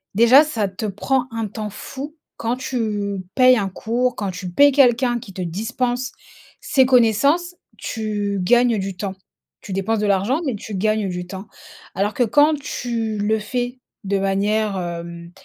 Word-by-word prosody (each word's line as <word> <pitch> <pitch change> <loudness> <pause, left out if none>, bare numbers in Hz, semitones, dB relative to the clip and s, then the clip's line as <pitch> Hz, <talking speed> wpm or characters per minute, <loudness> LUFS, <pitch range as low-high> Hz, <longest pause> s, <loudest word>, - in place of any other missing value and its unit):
déjà 240 +7 +7
ça 230 -9 -1
te 190 +3 -6
prend 245 +6 -1
un 225 -1 -3
temps 210 +1 -5
fou 280 +8 -8 0.2
quand 235 +2 -2
tu 210 -6 -2
payes 255 -1 +6
un 200 -3 -1
cours, 240 +6 -1
quand 200 -2 -2
tu 185 0 -6
payes 285 +11 +5
quelqu'un 245 -2 +4
qui 200 -4 -12
te 185 - -5
dispense 240 +8 -2 0.5
ses 265 -1 +3
connaissances, 270 - +3 0.2
tu 210 -3 -3
gagnes 240 +2 +4
du 195 0 -4
temps. 190 +1 -4 0.5
Tu 195 - -7
dépenses 195 +4 0
de 210 - 0
l'argent, 200 - +1
mais 265 - 0
tu 205 +1 -7
gagnes 215 0 0
du 180 0 -4
temps. 190 +3 -8 0.5
Alors, 205 +2 0
que 250 - -3
quand 290 +7 +4
tu 230 -5 -3
le 215 +2 +1
fais 245 +3 -3 0.2
de 200 0 0
manière, 200 +1 0
hem, 170 -1 -6
220 Hz, 165 wpm, -21 LUFS, 195-250 Hz, 0.5 s, déjà